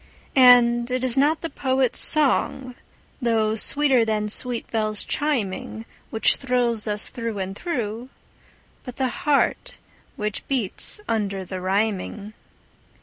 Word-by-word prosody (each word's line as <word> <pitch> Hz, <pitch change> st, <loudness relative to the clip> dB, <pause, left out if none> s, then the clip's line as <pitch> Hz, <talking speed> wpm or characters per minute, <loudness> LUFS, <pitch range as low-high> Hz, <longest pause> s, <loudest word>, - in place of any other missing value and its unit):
And 245 Hz, -2 st, +6 dB
it 255 Hz, 0 st, -2 dB
is 255 Hz, -2 st, 0 dB
not 295 Hz, +4 st, +2 dB
the 330 Hz, -, -4 dB
poet's 260 Hz, -2 st, 0 dB
song, 270 Hz, -3 st, +1 dB, 0.5 s
though 225 Hz, -3 st, +1 dB
sweeter 265 Hz, +2 st, +3 dB
than 215 Hz, -1 st, -1 dB
sweet 245 Hz, +2 st, -1 dB
bells 215 Hz, -2 st, 0 dB
chiming, 225 Hz, -6 st, -2 dB, 0.2 s
Which 220 Hz, -, +2 dB
thrills 245 Hz, -4 st, 0 dB
us 210 Hz, 0 st, -1 dB
through 230 Hz, -4 st, -4 dB
and 190 Hz, 0 st, -4 dB
through, 240 Hz, -, -4 dB, 0.7 s
but 250 Hz, -2 st, -9 dB
the 260 Hz, -1 st, -1 dB
heart 285 Hz, +3 st, 0 dB, 0.4 s
which 210 Hz, -1 st, -4 dB
beats 260 Hz, -, 0 dB
under 200 Hz, -4 st, -2 dB
the 185 Hz, 0 st, -6 dB
rhyming. 200 Hz, +2 st, -2 dB
235 Hz, 125 wpm, -23 LUFS, 215-260 Hz, 0.7 s, And